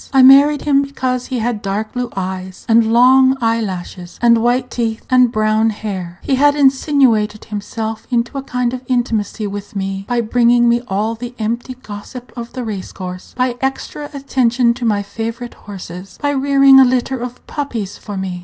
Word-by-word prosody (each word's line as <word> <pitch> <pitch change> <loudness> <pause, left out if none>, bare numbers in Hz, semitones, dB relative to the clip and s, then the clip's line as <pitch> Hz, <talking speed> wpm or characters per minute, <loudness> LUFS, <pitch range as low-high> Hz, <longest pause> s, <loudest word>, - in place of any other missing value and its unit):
I 265 -1 +5
married 280 +3 +7
him 280 -2 +3
because 260 -3 -3
he 255 - -3
had 230 -2 -2
dark 210 +1 -3
blue 245 -1 -3
eyes, 185 0 -5
and 225 0 +4
long 260 +2 +5
eye 230 -1 +1
lashes, 180 -3 -6
and 235 -1 +4
white 245 +2 0
teeth, 225 -2 -3
and 250 -2 +5
brown 215 0 +2
hair. 190 -5 -5
He 275 - -1
had 285 +2 +4
insinuated 265 -7 +2
himself 220 +1 -5
into 240 0 -1
a 275 - -2
kind 250 -2 -2
of 255 - -4
intimacy 230 -4 -1
with 205 0 -7
me 195 0 -3
by 240 -1 0
bringing 240 +1 +3
me 235 0 +3
all 210 +4 -1
the 245 +2 -8
empty 235 +3 -3
gossip 215 +4 -9
of 235 -1 -7
the 255 - -4
race 205 -5 -5
course, 180 -1 -8
by 250 -1 0
extra 270 +2 -3
attention 255 -4 +1
to 240 0 -5
my 205 -3 +1
favorite 225 +4 -6
horses, 190 -2 -10
by 285 - 0
rearing 275 -1 +5
a - - +9
litter 255 +1 0
of 245 +1 -7
puppies 235 -10 -5
for 205 -2 -7
me. 185 -2 -4
235 Hz, 180 wpm, -17 LUFS, 210-255 Hz, -, a